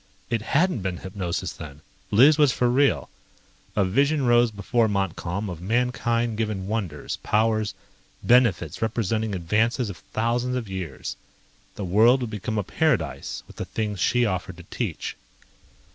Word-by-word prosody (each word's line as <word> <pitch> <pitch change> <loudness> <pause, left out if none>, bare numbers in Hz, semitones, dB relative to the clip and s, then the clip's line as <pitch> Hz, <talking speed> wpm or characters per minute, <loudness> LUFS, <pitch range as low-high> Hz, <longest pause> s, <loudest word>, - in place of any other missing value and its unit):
It 115 -2 +1
hadn't 150 - +1
been 95 -1 -3
hypnosis 95 -1 -4
then! 75 -2 -10 0.3
Liz 135 +9 +6
was 145 -3 +6
for 125 - +1
real. 140 +2 +2 0.7
A 100 - +3
vision 140 +8 +2
rose 120 0 +5
before 110 +2 +1
Montcalm 100 0 -2
of 85 -3 -6
mankind 115 +1 0
given 105 -4 -2
wonders, 95 -9 -3
powers, 110 -1 +1 0.5
benefits 105 - +3
representing 110 -1 -1
advances 110 +6 0
of 90 - -11
thousands 120 +3 0
of 120 -4 -3
years. 90 -8 -5 0.6
The 100 - -4
world 115 +8 +5
could 120 -3 -3
become 110 +1 -3
a 105 - +1
paradise 90 - -1
with - - -16
the - - -3
things 105 -3 -3
she 120 +6 +3
offered 95 -3 -3
to 90 - -11
teach. 105 -10 -3
110 Hz, 145 wpm, -25 LUFS, 95-120 Hz, 0.7 s, Liz